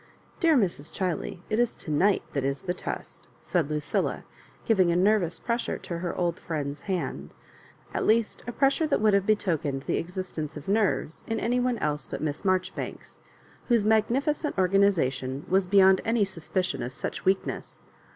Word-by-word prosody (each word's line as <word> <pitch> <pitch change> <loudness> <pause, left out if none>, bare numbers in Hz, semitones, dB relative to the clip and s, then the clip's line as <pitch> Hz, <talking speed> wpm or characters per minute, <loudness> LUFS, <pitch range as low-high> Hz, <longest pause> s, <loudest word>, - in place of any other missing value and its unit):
Dear 325 -4 +4
Mns. 170 - 0
Chiley, 180 -1 -3
it 215 - 0
is 240 -1 +2
to 155 - -7
night 190 +7 +3
that 140 - -1
is 140 +4 -2
the 180 -2 -1
test," - - -7 0.2
said 140 - 0
Lucilla, 150 -1 -1 0.4
giving 190 -6 +4
a - - +1
nervous 185 -2 +3
pressure 235 0 -1
to 170 -1 -5
her 175 0 -3
old 175 -1 0
friend's 145 -3 -4
hand; 185 -2 -3 0.6
at - - -1
least 225 0 +2
a - - -2
pressure 275 +6 +2
that 295 - +1
would 215 -1 +3
have 200 0 +2
betokened 165 -10 0
the - - 0
exist 180 0 -5
ence 155 0 -4
of 150 - -10
nerves 200 -5 0
in 225 -1 -1
any 245 +2 +1
one 245 -1 +1
else 150 -4 -2
but - - -5
Miss 150 -2 -3
Mar 185 -1 +4
joribanks, 185 - -8 0.5
whose 235 -4 +3
magnificent 260 +8 +1
organisation 170 -9 +2
was 190 0 +2
beyond 190 0 +6
any 225 -2 +2
suspicion 185 0 -2
of 120 +2 -4
such - - -4
weakness. 190 +1 -1
190 Hz, 175 wpm, -27 LUFS, 160-220 Hz, 0.6 s, beyond